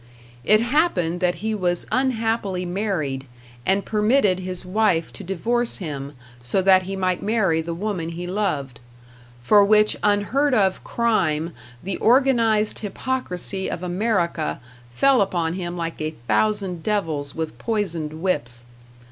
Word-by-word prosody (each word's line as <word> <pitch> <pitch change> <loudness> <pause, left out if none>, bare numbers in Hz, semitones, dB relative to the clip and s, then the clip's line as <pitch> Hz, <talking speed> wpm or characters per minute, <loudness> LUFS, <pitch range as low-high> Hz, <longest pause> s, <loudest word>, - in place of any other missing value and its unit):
It 215 - +4
happened 230 - +1
that 180 -1 +1
he 220 - 0
was 175 -4 0
unhappily 225 -7 0
married, 175 -8 -2 0.4
and 195 +1 +2
permitted 210 -3 +2
his 185 -1 -6
wife 185 -4 +1
to - - -9
divorce 230 +7 0
him 145 -6 -6 0.3
so 120 +10 0
that 190 0 +5
he 195 - -3
might 185 -2 0
marry 200 -7 +1
the 165 +1 -5
woman 185 -3 -3
he 175 +1 -5
loved; 175 -9 -2 0.6
for 205 +10 +6
which 210 +1 +4
unheard 220 +7 +2
of 190 -4 +1
crime 170 -9 0 0.3
the 190 +1 -3
organized 230 -4 +3
hypocrisy 200 -4 -2
of 175 - -5
America 180 -4 -1 0.3
fell 255 - +3
upon 170 -4 0
him 175 -1 -4
like 165 -1 -4
a 155 0 -3
thousand 200 -5 0
devils 160 -9 -2
with 160 -1 -4
poisoned 170 -8 -2
whips. 120 -10 +1
190 Hz, 135 wpm, -22 LUFS, 165-215 Hz, 0.6 s, for